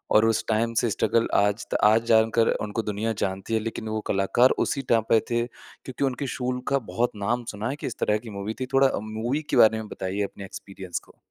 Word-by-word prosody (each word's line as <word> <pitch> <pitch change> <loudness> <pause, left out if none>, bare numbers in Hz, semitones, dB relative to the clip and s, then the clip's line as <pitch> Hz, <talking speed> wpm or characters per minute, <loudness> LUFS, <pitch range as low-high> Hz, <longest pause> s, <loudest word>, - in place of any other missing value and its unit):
और 110 - +6
उस 115 0 +2
टाइम 115 +1 +1
से 120 - +1
स्ट्रगल, 115 +2 +1
आज 105 +1 +2
त - - +3
आज 110 +2 +5
जानकर 115 0 +4 0.2
उनको 105 +2 -2
दुनिया 105 +2 -2
जानती 95 +3 -3
है, 110 - +3
लेकिन 110 0 -5
वो 110 0 -2
कलाकार 100 +6 +4 0.2
उसी 140 - -1
टाइम 115 -1 +4
पे 115 - +6
थे, 120 0 +1
क्योंकि 130 +2 -9
उनके 135 +1 -1
शूल 125 0 -2
का 140 0 +2
बहुत 120 +1 +1
नाम 115 +4 -1
सुना 105 +3 -4
है 135 - -2
कि 145 - -5
इस 120 - -6
तरह 105 0 +2
की 110 +1 -10
मूवी 105 +3 -3
थी। 130 - -1
थोड़ा 135 0 +5 0.2
मूवी 120 +7 -1
के - - +1
बारे 110 0 +6
में 110 -1 -5
बताइए 95 +2 -3
अपने 100 0 -6
एक्सपीरियंस 95 -2 -7
को। - - -21
110 Hz, 230 wpm, -25 LUFS, 105-120 Hz, 0.2 s, और